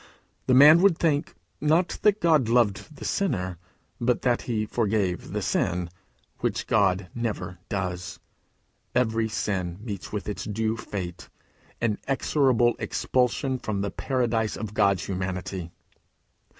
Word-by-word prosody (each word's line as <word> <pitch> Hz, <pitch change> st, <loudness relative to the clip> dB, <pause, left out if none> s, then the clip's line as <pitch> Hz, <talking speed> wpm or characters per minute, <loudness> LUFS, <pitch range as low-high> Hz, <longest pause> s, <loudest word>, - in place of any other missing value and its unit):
The 130 Hz, -, +4 dB
man 150 Hz, +5 st, +9 dB
would 190 Hz, -4 st, +5 dB
think, 155 Hz, -2 st, 0 dB, 0.3 s
not 160 Hz, +5 st, +2 dB
that 210 Hz, 0 st, +3 dB
God 155 Hz, -8 st, +3 dB
loved 120 Hz, +4 st, +1 dB
the -, -, -8 dB
sinner, 95 Hz, -, -1 dB, 0.4 s
but 120 Hz, +1 st, +1 dB
that 125 Hz, -2 st, +2 dB
he 110 Hz, -3 st, -1 dB
forgave 105 Hz, -5 st, -1 dB
the -, -, -2 dB
sin, 90 Hz, -1 st, 0 dB, 0.5 s
which -, -, -1 dB
God 95 Hz, -3 st, +2 dB
never 100 Hz, -7 st, -4 dB
does. 90 Hz, -4 st, -3 dB, 0.8 s
Every 115 Hz, -2 st, +1 dB
sin 95 Hz, -5 st, -2 dB
meets 105 Hz, -4 st, -6 dB
with 105 Hz, -1 st, -4 dB
its 105 Hz, -, -4 dB
due 110 Hz, +1 st, -1 dB
fate 90 Hz, -6 st, -6 dB, 0.5 s
inexorable 120 Hz, +1 st, +2 dB
expulsion 130 Hz, +1 st, 0 dB
from 105 Hz, -4 st, -2 dB
the 100 Hz, -, -2 dB
paradise 115 Hz, -5 st, -1 dB
of 105 Hz, -1 st, -5 dB
God's 100 Hz, -4 st, +2 dB
Humanity. 95 Hz, -2 st, -4 dB
110 Hz, 125 wpm, -26 LUFS, 95-125 Hz, 0.8 s, man